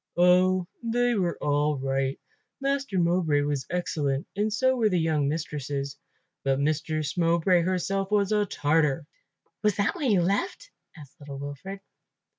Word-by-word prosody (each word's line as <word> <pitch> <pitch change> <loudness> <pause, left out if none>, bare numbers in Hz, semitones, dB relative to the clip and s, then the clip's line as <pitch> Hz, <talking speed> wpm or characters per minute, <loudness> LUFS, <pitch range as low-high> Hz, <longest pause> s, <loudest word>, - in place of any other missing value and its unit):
"Oh, 180 +1 +4 0.2
they 240 +1 +1
were 180 -6 0
all 145 0 +1
right. 135 0 -1 0.4
Master 275 -6 -1
Mowbray 170 -4 +2
was 145 -2 -2
excellent 150 -6 -1
and 210 +2 0
so 260 +4 +2
were 225 -4 +2
the 180 -3 +1
young 155 -3 +1
mistresses, 145 -3 -3 0.5
but 135 0 +1
Mistress 155 +1 -1
Mowbray 170 +1 +3
herself 190 +2 -1
was 205 -1 +2
a 210 -1 +2
tartar." 150 -2 +1 0.6
"Was 210 -3 +2
that 200 -1 +1
why 325 -5 -3
you 205 -8 +4
left?" 360 - -1 0.3
asked 155 +3 -14
little 140 -1 -8
Wilfred. 145 +8 -7
170 Hz, 145 wpm, -27 LUFS, 145-200 Hz, 0.6 s, Oh